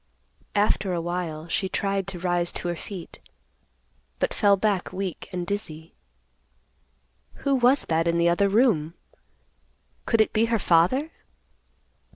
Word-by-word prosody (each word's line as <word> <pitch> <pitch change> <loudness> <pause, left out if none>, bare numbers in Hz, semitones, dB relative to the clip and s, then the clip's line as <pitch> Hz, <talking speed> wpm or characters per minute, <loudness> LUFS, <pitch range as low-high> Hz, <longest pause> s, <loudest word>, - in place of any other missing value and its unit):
After 205 -2 +1
awhile, 170 -2 -3
she 190 +2 -1
tried 195 0 -1
to 195 -2 -5
rise 175 -1 0
to - - -4
her 175 - -2
feet, 180 0 -9 1.0
but - - -1
fell 200 -2 +4
back 200 -2 0
weak 185 -2 -5
and 180 -2 -3
dizzy. 165 -5 -5 1.5
Who 280 - +3
was 260 +1 +3
that 165 +1 +1
in 170 0 +2
the 170 0 +3
other 185 +4 +3
room? 195 - +2 1.1
Could 230 - +2
it 220 - +3
be 220 +1 +3
her 230 0 +1
father? 215 - +2
185 Hz, 135 wpm, -25 LUFS, 170-210 Hz, 1.5 s, fell